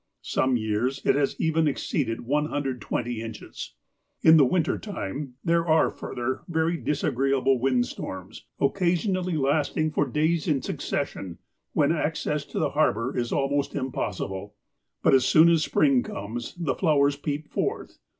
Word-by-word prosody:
Some 130 -1 +1
years 110 +5 -1
it - - +5
has 140 -1 0
even 160 0 +2
exceeded 135 -4 -1
120 130 -4 -2
inches. 110 - -8 0.5
In 160 0 +8
the 145 - +7
winter 165 +4 +1
time, 140 - -5
there 170 0 +2
are, 160 0 +4
fur - - -8
ther, 125 +1 -2
very 165 0 +1
disagreeable 135 -3 +1
wind 125 -1 +2
storms, - - -8
occasionally 180 +2 +1
lasting 150 +2 +1
for 145 - +1
days 155 +5 0
in 145 -5 +1
succession, 90 -3 -3 0.4
when - - +3
access - - -1
to - - -8
the - - +1
harbour 115 +6 +1
is 120 -1 -1
almost 140 0 0
impossible. 105 -7 -4 0.5
But - - +5
as 130 -1 +6
soon 160 +2 +6
as 165 -2 +3
spring 140 -5 +3
comes, 115 +3 -6
the 165 -6 -1
flowers 145 -4 +2
peep 145 +1 -4
forth. - - -3
140 Hz, 145 wpm, -26 LUFS, 125-155 Hz, 0.5 s, In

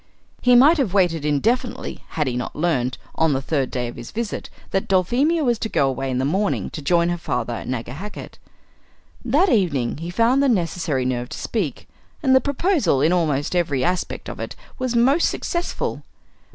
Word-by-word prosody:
He 250 0 +5
might 295 +7 +6
have 210 -8 0
waited 175 -5 +2
indefinitely 230 - -1
had 150 - +2
he 125 -2 -2
not 125 - -4
learned, 145 -6 0 0.2
on 160 -2 +2
the 135 - +1
third 140 -2 -1
day 125 -1 -2
of 120 - -8
his 120 -1 -8
visit, 230 -2 -4 0.2
that 195 - 0
Dulphemia 255 - +2
was 240 -4 +1
to 220 - -3
go 140 - +2
away 135 0 -2
in 125 - -1
the 130 - 0
morning 190 +7 0
to 155 - -6
join 170 +3 +2
her 175 0 -2
father 120 -6 -2
at - - -6
Nagahakett. 130 - -6 0.8
That 290 - +3
evening 160 - +1
he 165 +3 -6
found 230 +8 +3
the 280 - +3
necessary 165 - 0
nerve 125 -1 -2
to - - -6
speak, 185 - -3 0.4
and 265 -2 +5
the 260 - +6
proposal 285 - +1
in 155 +5 +3
almost 155 -3 0
every 145 -7 +1
aspect 180 +3 -2
of - - -7
it - - -5 0.2
was 255 -2 -1
most 270 +8 +4
successful. 345 0 -3
175 Hz, 190 wpm, -22 LUFS, -, 0.8 s, might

